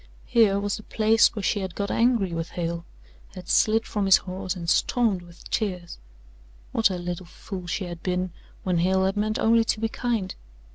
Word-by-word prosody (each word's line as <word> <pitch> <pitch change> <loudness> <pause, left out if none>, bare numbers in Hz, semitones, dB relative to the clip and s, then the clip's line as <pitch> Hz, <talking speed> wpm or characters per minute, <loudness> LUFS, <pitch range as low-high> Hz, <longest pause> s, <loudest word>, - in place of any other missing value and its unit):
Here 210 -4 +4
was 205 +1 -1
the - - -9
place 220 +2 +3
where 210 - -4
she 205 - +1
had 190 -3 -5
got 200 -1 -2
angry 230 -6 +2
with 165 0 -3
Hale, 170 0 -3 0.5
had 180 -1 -9
slid 225 +1 +3
from 205 -2 -1
his 190 - +8
horse 185 0 -5
and 170 -2 -6
stormed 215 0 +2
with 175 0 -14
tears. 180 -6 -2 0.7
What 225 -2 +3
a 185 - -3
little 175 0 -5
fool 180 0 -8
she 185 +2 -2
had 175 -1 -7
been 180 0 -1 0.3
when 180 -2 +1
Hale 190 +2 +2
had 190 +1 0
meant 215 +1 0
only 230 0 +4
to 220 - 0
be 225 0 0
kind! 225 -6 -2
190 Hz, 195 wpm, -25 LUFS, 180-215 Hz, 0.7 s, his